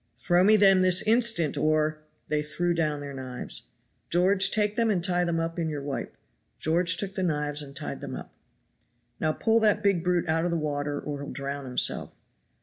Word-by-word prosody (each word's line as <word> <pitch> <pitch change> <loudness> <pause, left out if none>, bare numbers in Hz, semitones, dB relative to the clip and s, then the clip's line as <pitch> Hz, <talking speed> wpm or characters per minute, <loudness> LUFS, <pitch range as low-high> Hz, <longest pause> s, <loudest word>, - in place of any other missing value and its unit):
"Throw 175 0 +2
me 215 +3 +6
them 195 -2 +5
this 185 -1 +4
instant, 220 -10 +2
or 155 0 +1 0.2
" - - -44
They 150 0 0
threw 175 +4 -1
down 155 -3 -1
their 140 -1 -7
knives. 130 -2 -6 0.4
"George, 185 +2 +3
take 210 -1 0
them 230 -1 +1
and 185 -5 0
tie 180 -1 +2
them 170 -1 -1
up 165 +1 -3
in 165 -1 -1
your 145 -2 -5
wipe." 140 -1 -5 0.4
George 165 +2 +2
took 195 +1 -4
the 190 - -3
knives 150 -4 0
and 140 -1 -10
tied - - -5
them - - -6
up. - - -9 0.9
"Now 155 - +1
pull 225 +7 +1
that 210 -1 +2
big 195 -5 +2
brute 180 -1 0
out 160 +1 +1
of 175 - 0
the 170 - -1
water 145 -1 -2
or 145 -1 -6
he'll 140 - -7
drown 140 0 -5
himself." 125 -1 +1
165 Hz, 205 wpm, -26 LUFS, 150-185 Hz, 0.9 s, me